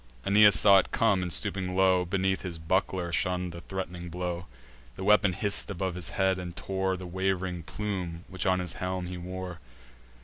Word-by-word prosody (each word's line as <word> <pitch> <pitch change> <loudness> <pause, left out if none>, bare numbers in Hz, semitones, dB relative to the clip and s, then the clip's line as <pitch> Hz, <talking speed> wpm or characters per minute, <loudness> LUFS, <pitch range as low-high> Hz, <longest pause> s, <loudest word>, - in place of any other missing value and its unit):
Aeneas 105 +1 +6
saw 100 -2 +7
it - - -3
come, 105 -5 +2
and, 90 -1 -3
stooping 95 -1 +1
low 95 -1 +4
Beneath 95 +1 0
his 90 -3 -5
buckler, 90 +1 -1
shunn'd 90 +1 0
the 85 0 -9
threat'ning 90 -1 -6
blow. 90 +1 -4 0.5
The - - -6
weapon 105 -1 +4
hiss'd 100 +3 0
above 95 -1 -2
his 90 -2 -3
head, 95 -1 +2
and 90 -1 -7
tore 95 -1 -2
The 90 - -8
waving 95 0 -2
plume 90 -2 -5
which 95 0 -3
on 95 0 +3
his 90 -2 -3
helm 90 0 -3
he 90 0 -6
wore. 90 -1 -6
95 Hz, 180 wpm, -28 LUFS, 90-95 Hz, 0.5 s, saw